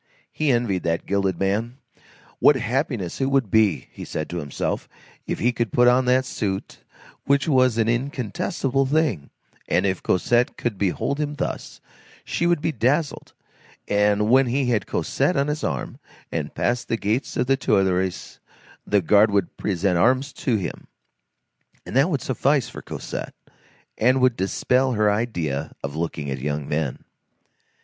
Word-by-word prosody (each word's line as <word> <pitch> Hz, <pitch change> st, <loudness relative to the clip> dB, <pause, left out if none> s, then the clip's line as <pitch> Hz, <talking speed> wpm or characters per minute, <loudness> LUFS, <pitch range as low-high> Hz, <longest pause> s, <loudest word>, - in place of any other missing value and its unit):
He 155 Hz, -2 st, +1 dB
envied 120 Hz, -7 st, +1 dB
that 85 Hz, 0 st, -1 dB
gilded 100 Hz, -1 st, 0 dB
man; 110 Hz, +6 st, -1 dB, 0.6 s
what 150 Hz, -, +6 dB
happiness 120 Hz, -, -2 dB
it 135 Hz, -, +2 dB
would 135 Hz, -7 st, +1 dB
be, 100 Hz, -11 st, +3 dB
he -, -, -9 dB
said 75 Hz, -, -5 dB
to 90 Hz, -, -3 dB
himself, 70 Hz, -3 st, -3 dB, 0.4 s
if -, -, -2 dB
he 120 Hz, -, +2 dB
could 120 Hz, -4 st, -2 dB
put 120 Hz, 0 st, +4 dB
on 125 Hz, +1 st, +4 dB
that 130 Hz, +1 st, +3 dB
suit 100 Hz, -6 st, -4 dB, 0.5 s
which 140 Hz, +2 st, +2 dB
was 130 Hz, -5 st, +3 dB
an 115 Hz, -1 st, +2 dB
incontestable 130 Hz, +2 st, -1 dB
thing; 135 Hz, -, 0 dB, 0.4 s
and -, -, +2 dB
if 95 Hz, -1 st, 0 dB
Cosette 120 Hz, +6 st, +1 dB
could 115 Hz, -5 st, -3 dB
behold 100 Hz, +9 st, -1 dB
him 150 Hz, -1 st, -2 dB
thus, -, -, -5 dB, 0.4 s
she 170 Hz, -, 0 dB
would 175 Hz, -3 st, +2 dB
be 165 Hz, -, 0 dB
dazzled, 145 Hz, +5 st, -1 dB, 0.5 s
and 105 Hz, 0 st, +2 dB
when 130 Hz, +3 st, +5 dB
he 130 Hz, +1 st, 0 dB
had 105 Hz, -5 st, 0 dB
Cosette -, -, 0 dB
on 140 Hz, +1 st, +1 dB
his 150 Hz, +1 st, -3 dB
arm -, -, -3 dB, 0.3 s
and -, -, -4 dB
passed 120 Hz, 0 st, 0 dB
the 115 Hz, -, 0 dB
gates 110 Hz, +5 st, -1 dB
of -, -, +2 dB
the 135 Hz, +1 st, +3 dB
Tuileries, 95 Hz, -7 st, 0 dB, 0.5 s
the 105 Hz, -1 st, +3 dB
guard 105 Hz, +5 st, +5 dB
would 100 Hz, -3 st, 0 dB
present 95 Hz, -2 st, 0 dB
arms 130 Hz, +7 st, +2 dB
to 125 Hz, -, -1 dB
him, 95 Hz, -5 st, -4 dB, 1.0 s
and -, -, -7 dB
that 135 Hz, +6 st, +4 dB
would 145 Hz, -6 st, -1 dB
suffice 135 Hz, -1 st, +1 dB
for -, -, -9 dB
Cosette, -, -, -6 dB, 0.6 s
and 125 Hz, +4 st, +4 dB
would 130 Hz, -2 st, +3 dB
dispel 125 Hz, +7 st, +1 dB
her 105 Hz, -2 st, +3 dB
idea 85 Hz, -, -2 dB
of 70 Hz, +1 st, -4 dB
looking 80 Hz, -3 st, -3 dB
at 65 Hz, -, -3 dB
young 75 Hz, +1 st, -3 dB
men. 75 Hz, -3 st, -2 dB
115 Hz, 160 wpm, -23 LUFS, 95-130 Hz, 1.0 s, what